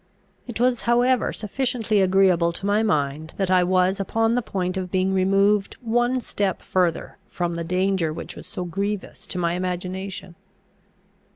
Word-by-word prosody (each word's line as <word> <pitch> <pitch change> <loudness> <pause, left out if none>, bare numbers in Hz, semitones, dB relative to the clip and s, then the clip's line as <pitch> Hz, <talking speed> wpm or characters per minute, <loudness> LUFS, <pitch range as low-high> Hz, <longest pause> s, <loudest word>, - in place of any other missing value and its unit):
It 240 -2 -5
was 245 -1 +2
however 245 +1 +3
sufficiently 225 -2 0
agreeable 185 -3 +4
to 195 - -5
my 205 +2 +2
mind, 155 -5 -1
that 195 -2 0
I 185 -1 +5
was 185 +1 +2
upon 225 +3 +1
the 245 - +1
point 185 -4 -3
of 185 -1 -3
being 185 +1 +1
removed 195 +2 +2
one 240 +2 +1
step 200 -4 -2
further 180 -3 -1
from 175 -1 -2
the 170 0 -3
danger 180 -1 0
which 155 - -7
was - - -10
so 180 - -5
grievous 200 +3 -4
to - - -5
my 170 -1 0
imagination. 185 +1 -4
190 Hz, 160 wpm, -23 LUFS, 180-210 Hz, -, I